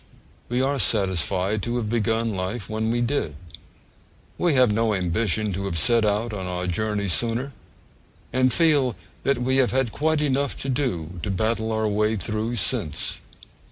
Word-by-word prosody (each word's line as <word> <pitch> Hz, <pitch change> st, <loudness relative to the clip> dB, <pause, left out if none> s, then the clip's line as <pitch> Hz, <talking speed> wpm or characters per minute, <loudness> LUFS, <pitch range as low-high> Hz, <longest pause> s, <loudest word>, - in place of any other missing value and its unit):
We 125 Hz, +2 st, +1 dB
are 140 Hz, +1 st, 0 dB
satisfied 95 Hz, -1 st, +1 dB
to 120 Hz, +4 st, -2 dB
have 115 Hz, -3 st, -2 dB
begun 115 Hz, 0 st, 0 dB
life 95 Hz, +4 st, -3 dB
when 110 Hz, +1 st, -1 dB
we 120 Hz, +1 st, +1 dB
did; 120 Hz, -, -1 dB, 1.0 s
we 170 Hz, -5 st, +1 dB
have 125 Hz, -5 st, +5 dB
no 110 Hz, -1 st, +1 dB
ambition 100 Hz, +3 st, 0 dB
to 100 Hz, +2 st, -3 dB
have 85 Hz, -4 st, -2 dB
set 115 Hz, +7 st, +4 dB
out 105 Hz, +2 st, 0 dB
on 95 Hz, -3 st, -4 dB
our 90 Hz, 0 st, -3 dB
journey 100 Hz, +3 st, -1 dB
sooner; 115 Hz, +8 st, 0 dB, 0.8 s
and 130 Hz, 0 st, +3 dB
feel 145 Hz, -8 st, +3 dB, 0.3 s
that 140 Hz, -1 st, +1 dB
we 130 Hz, +2 st, +1 dB
have 130 Hz, -2 st, +4 dB
had 130 Hz, -3 st, 0 dB
quite 155 Hz, +3 st, +1 dB
enough 140 Hz, -1 st, 0 dB
to 135 Hz, -, -3 dB
do 90 Hz, -, -2 dB
to 95 Hz, -, -3 dB
battle 110 Hz, +3 st, 0 dB
our 110 Hz, 0 st, 0 dB
way 105 Hz, +1 st, +1 dB
through 110 Hz, +3 st, -2 dB
since. 95 Hz, -, -1 dB
110 Hz, 165 wpm, -24 LUFS, 100-125 Hz, 1.0 s, have